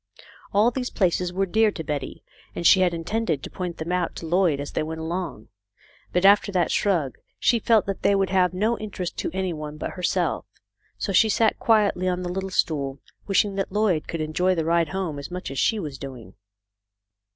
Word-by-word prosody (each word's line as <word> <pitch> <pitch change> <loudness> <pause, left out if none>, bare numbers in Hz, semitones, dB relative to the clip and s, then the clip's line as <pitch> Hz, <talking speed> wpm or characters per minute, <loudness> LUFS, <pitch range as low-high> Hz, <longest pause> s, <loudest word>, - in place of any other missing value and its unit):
All 215 +4 +4
these 250 0 -3
places 180 -2 0
were 195 +2 0
dear 220 +3 +3
to 160 - -5
Betty, 145 -3 -4 0.3
and 170 - -4
she 190 - +7
had 185 -1 +3
intended 170 -2 -2
to - - -7
point 180 -2 -5
them 160 +2 -4
out 180 -1 -1
to - - -7
Lloyd 170 -3 +2
as 145 - -5
they - - -1
went 160 +1 -4
along; 165 -8 -4 0.6
but 180 +1 +1
after 200 +1 +6
that 180 -3 +1
shrug, 170 -10 0 0.2
she 235 - +3
felt 225 -1 +3
that 195 -1 -4
they 200 - +3
would 195 -1 +1
have 185 -2 +3
no 215 +6 0
interest 190 -4 -5
for - - -2
any 190 -1 -2
one 150 -1 -7
but - - -4
herself. 180 -1 -1 0.5
So 195 - -2
she 220 +4 +5
sat 220 +1 +2
quietly 210 -5 +2
on 180 0 -1
the 175 - -3
little 190 +1 -3
stool, 140 -7 -1 0.3
wishing 200 0 +2
that 195 - -2
Lloyd 205 -6 +1
could 165 - -3
enjoy 180 +4 +1
the 165 -2 -1
ride 165 -1 +2
home 185 -6 -3
as 140 - -7
much 180 -4 -5
as 135 - -3
she 225 - +2
was 150 -9 -5
doing. 125 -8 -9
180 Hz, 205 wpm, -24 LUFS, 160-195 Hz, 0.6 s, she